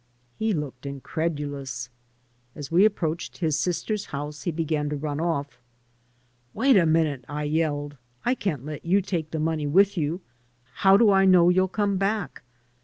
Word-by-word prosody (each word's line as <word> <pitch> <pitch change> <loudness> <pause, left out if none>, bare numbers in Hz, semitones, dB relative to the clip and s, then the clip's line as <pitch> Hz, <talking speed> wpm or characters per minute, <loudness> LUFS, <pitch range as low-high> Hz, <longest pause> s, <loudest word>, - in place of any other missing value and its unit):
He 220 0 +1
looked 140 -6 -4
incredulous. 140 -3 -4 0.6
As 145 -1 -8
we 180 +5 +5
approached 170 -6 -1
his 160 -4 0
sister's 200 +5 -2
house 145 +1 -6
he 175 - -2
began 155 -2 -1
to 150 - -2
run 145 0 -3
off. 145 -6 -2 0.5
" 125 0 -40
Wait 260 +4 +4
a 175 -4 +5
minute," 155 -5 +1
I 150 0 -3
yelled. 145 -2 -1 0.3
"I 245 - +3
can't 155 - -3
let 150 -1 -6
you 190 +3 +2
take 170 -5 -3
the 160 - -4
money 155 -1 -1
with 195 +5 +3
you. 160 +4 -2 0.5
How 195 +4 +5
do 215 -1 +5
I 195 0 +4
know 180 -2 +6
you'll 185 +1 +3
come 200 0 0
back?" 195 -5 -2
160 Hz, 170 wpm, -25 LUFS, 145-190 Hz, 0.6 s, know